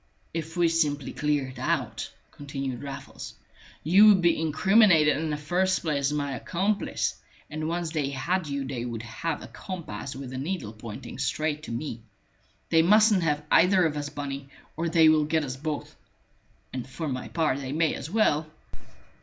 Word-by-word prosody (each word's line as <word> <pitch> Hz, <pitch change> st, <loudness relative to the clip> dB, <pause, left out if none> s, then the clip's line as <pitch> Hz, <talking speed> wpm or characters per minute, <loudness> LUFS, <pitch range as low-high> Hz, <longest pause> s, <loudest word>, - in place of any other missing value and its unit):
"If 165 Hz, +1 st, -5 dB
we 175 Hz, -1 st, +4 dB
simply 150 Hz, -4 st, 0 dB
cleared 145 Hz, -3 st, -1 dB
out," -, -, -1 dB, 0.2 s
continued 135 Hz, -3 st, -5 dB
Raffles, 140 Hz, -1 st, -8 dB, 0.5 s
"you 190 Hz, +7 st, +7 dB
would 205 Hz, -3 st, +7 dB
be 170 Hz, -2 st, +3 dB
incriminated 160 Hz, 0 st, +5 dB
in 160 Hz, +1 st, -2 dB
the 150 Hz, -, -1 dB
first 180 Hz, +5 st, +1 dB
place 145 Hz, -4 st, 0 dB
as 145 Hz, -, -1 dB
my 145 Hz, -2 st, -2 dB
accomplice, 190 Hz, +8 st, -1 dB, 0.3 s
and 155 Hz, +1 st, -3 dB
once 170 Hz, -1 st, -2 dB
they 150 Hz, -4 st, -1 dB
had 165 Hz, +6 st, -1 dB
you 140 Hz, -1 st, -3 dB
they 130 Hz, -3 st, -4 dB
would 115 Hz, -2 st, -5 dB
have 145 Hz, +7 st, -4 dB
a -, -, -8 dB
compass 155 Hz, -, -7 dB
with 135 Hz, -1 st, -7 dB
the 130 Hz, -, -4 dB
needle 140 Hz, -, -3 dB
pointing 110 Hz, +2 st, -8 dB
straight 150 Hz, +3 st, -1 dB
to -, -, -5 dB
me. 115 Hz, -1 st, -4 dB, 0.7 s
They 165 Hz, -1 st, +6 dB
mustn't 210 Hz, +2 st, +5 dB
have 150 Hz, -2 st, 0 dB
either 185 Hz, -1 st, +5 dB
of 155 Hz, -2 st, 0 dB
us, 145 Hz, -1 st, -3 dB
Bunny, 140 Hz, -1 st, -6 dB, 0.3 s
or 165 Hz, +1 st, -1 dB
they 165 Hz, -1 st, +5 dB
will 155 Hz, -1 st, +5 dB
get 160 Hz, +1 st, +1 dB
us 130 Hz, -3 st, -4 dB
both. 150 Hz, +2 st, -5 dB, 0.8 s
And 130 Hz, -1 st, -5 dB
for 155 Hz, +5 st, -4 dB
my 130 Hz, -2 st, -3 dB
part 155 Hz, -5 st, 0 dB
they 135 Hz, -1 st, -5 dB
may 160 Hz, +1 st, +1 dB
as 140 Hz, -, -6 dB
well!" 160 Hz, -7 st, +2 dB
150 Hz, 175 wpm, -27 LUFS, 135-165 Hz, 0.8 s, you